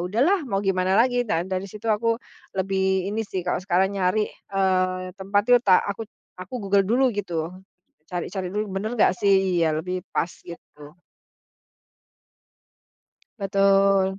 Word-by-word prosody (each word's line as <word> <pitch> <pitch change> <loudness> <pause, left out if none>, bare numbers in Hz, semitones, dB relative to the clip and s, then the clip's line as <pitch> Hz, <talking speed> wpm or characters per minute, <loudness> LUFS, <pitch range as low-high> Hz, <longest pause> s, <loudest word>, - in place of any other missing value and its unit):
udahlah 250 - +2
mau 195 -1 -1
gimana 190 0 +1
lagi, 245 +1 +3
dan 175 +2 -1
dari 185 +1 -2
situ 210 +3 -12
aku 225 +1 +1 0.4
lebih 190 0 0
ini 220 - -1
sih, 185 -2 -4
kalau 180 - -1
sekarang 190 +1 +1
nyari, 195 +2 +1
eee, 185 -1 -1
tempat 200 +1 +1
itu 245 - +7
tak 190 -6 +4
aku 205 +2 -5 0.3
aku 185 +8 -7
Google 200 0 +4
dulu 240 +4 +2
gitu, 170 -6 -2 0.6
cari-cari 180 +1 -4
dulu, 210 +2 -2
bener 215 +4 -3
nggak - - +4
sih 190 -3 +2
iya, 160 - +3
lebih 180 +2 -4
pas, 170 - -1
gitu. 150 -1 -13 2.4
Betul. 195 -1 +3
195 Hz, 140 wpm, -24 LUFS, 185-205 Hz, 2.4 s, itu